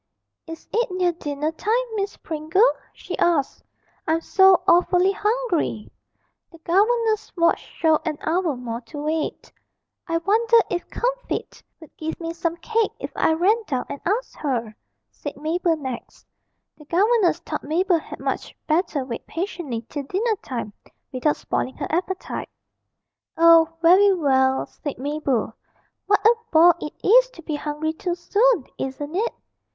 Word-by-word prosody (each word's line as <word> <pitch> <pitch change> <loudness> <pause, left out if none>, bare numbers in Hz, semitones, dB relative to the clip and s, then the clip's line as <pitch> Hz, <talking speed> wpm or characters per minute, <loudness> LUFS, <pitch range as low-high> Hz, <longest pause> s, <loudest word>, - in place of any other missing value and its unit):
'Is 325 0 -9
it 475 0 +1
near 365 -1 +1
dinner 300 -2 -3
time, 445 +9 0
Miss 400 -1 -3
Pringle?' 320 +9 +2 0.2
she - - -7
asked. 325 -6 +1 0.4
'I'm 320 +1 +1
so 380 +1 +5
awfully 360 +2 +4
hungry!' 415 - -1 0.6
The 330 - -14
governess's 430 +6 +1
watch 335 0 +3
showed 315 -2 0
an 315 -3 -2
hour 330 -2 0
more 240 -1 -5
to 295 +5 -11
wait. 305 +2 -3 0.6
'I 330 -1 0
wonder 450 +7 +3
if 350 -1 -3
Comfitt - - -3 0.2
would 315 - -16
give 320 0 -5
me 330 -1 -4
some 335 0 -2
cake 450 +5 0
if - - -6
I 320 - +2
ran 390 +8 +2
down 260 -4 -2
and 280 - -6
asked 435 +7 -2
her!' 235 -7 -2 0.4
said 290 - -7
Mabel 325 +2 0
next. 260 -5 -7 0.5
The 300 - -14
governess 390 +2 +3
thought 320 -3 -6
Mabel 345 +3 +1
had - - -10
much - - -4
better 310 -4 0
wait 240 -3 -7
patiently 330 - -4
till 290 - -4
dinner 415 - -1
time 230 -5 -5 0.4
without 275 +4 +1
spoiling 260 - -3
her - - -3
appetite. 370 +2 -3 0.9
'Oh, 330 -1 +7
very 380 +4 +7
well,' 265 -5 +2
said 290 - -7
Mabel; 275 -5 -1 0.5
'what 405 0 +2
a 450 - +8 0.2
bore 335 +2 +7
it 300 - -6
is - - +6
to 335 -9 -14
be 310 - -4
hungry 300 +1 -3
too 345 +2 -3
soon, 410 - +2
isn't 290 +4 -5
it?' 445 +5 0
335 Hz, 150 wpm, -23 LUFS, 295-390 Hz, 0.9 s, a